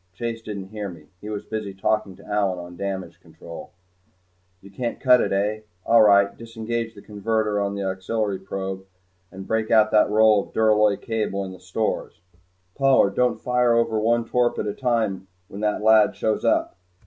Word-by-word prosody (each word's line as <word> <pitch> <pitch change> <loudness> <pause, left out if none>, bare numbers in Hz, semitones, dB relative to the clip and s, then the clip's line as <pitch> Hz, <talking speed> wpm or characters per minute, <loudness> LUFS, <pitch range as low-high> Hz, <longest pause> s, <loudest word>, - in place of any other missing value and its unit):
Chase 115 +1 -4
didn't 100 -3 -7
hear 105 -1 -5
me. 80 -4 -13
He 105 - -7
was 105 -1 -5
busy 105 -3 -5
talking 100 0 -1
to - - -17
Allyn 100 -3 0
on 90 0 -9
damage 95 -2 -5
control. 85 0 -11 0.9
"You 100 +2 -15
can't 120 +4 -4
cut 125 -2 +5
it, - - 0
hey? 105 +2 -1 0.2
All 115 - +5
right 100 -1 +5
disengage 115 0 -5
the 100 - -13
converter 105 0 -1
on 100 0 -2
the 100 - -3
auxiliary 95 +1 -2
probe 95 0 -6 0.4
and 95 0 -9
break 110 +1 -1
out 110 -1 +4
that 105 -1 +4
roll 110 -1 +5
of - - -23
duralloy 105 -2 +3
cable 105 -4 -2
in 95 - -7
the 95 - -11
stores 95 +2 -3 0.5
Pollard! 135 -7 +3
don't 120 0 +1
fire 125 -1 +2
over 115 -2 +1
one 115 +2 +1
torp 120 +1 +1
at - - -2
a 105 - -2
time 110 -7 -1 0.2
when 100 - -8
that 105 0 -1
lad 110 -1 +5
shows 110 -1 -1
up. - - +1
105 Hz, 185 wpm, -23 LUFS, 100-115 Hz, 0.9 s, cut